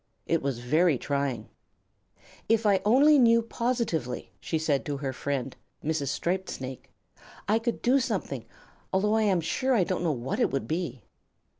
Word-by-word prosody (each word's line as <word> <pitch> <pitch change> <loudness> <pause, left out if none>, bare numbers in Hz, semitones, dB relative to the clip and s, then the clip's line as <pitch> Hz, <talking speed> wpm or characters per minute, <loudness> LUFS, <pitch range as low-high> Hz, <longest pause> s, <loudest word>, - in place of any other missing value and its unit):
It 165 - +1
was 135 -4 -2
very 155 +4 +3
trying. 135 -4 -2 1.0
"If 225 0 +3
I 195 -3 +4
only 280 +7 +6
knew 230 -2 +5
positively," 230 - -2
she 160 - -2
said 155 -3 0
to 145 -2 -2
her 135 -1 -3
friend, 135 -1 -3 0.3
Mrs. 155 -2 -1
Striped 185 +7 -1
Snake, 130 0 -7 0.6
"I 215 +2 +3
could 235 +1 -3
do 260 +3 +4
something, 195 - -3 0.4
although 205 +3 +2
I 220 - +3
am 185 -3 +2
sure 255 +11 0
I 200 - +4
don't 180 0 -2
know 165 - +2
what 130 -1 -3
it - - +3
would 135 - -2
be." 160 - -3
165 Hz, 165 wpm, -27 LUFS, 140-225 Hz, 1.0 s, only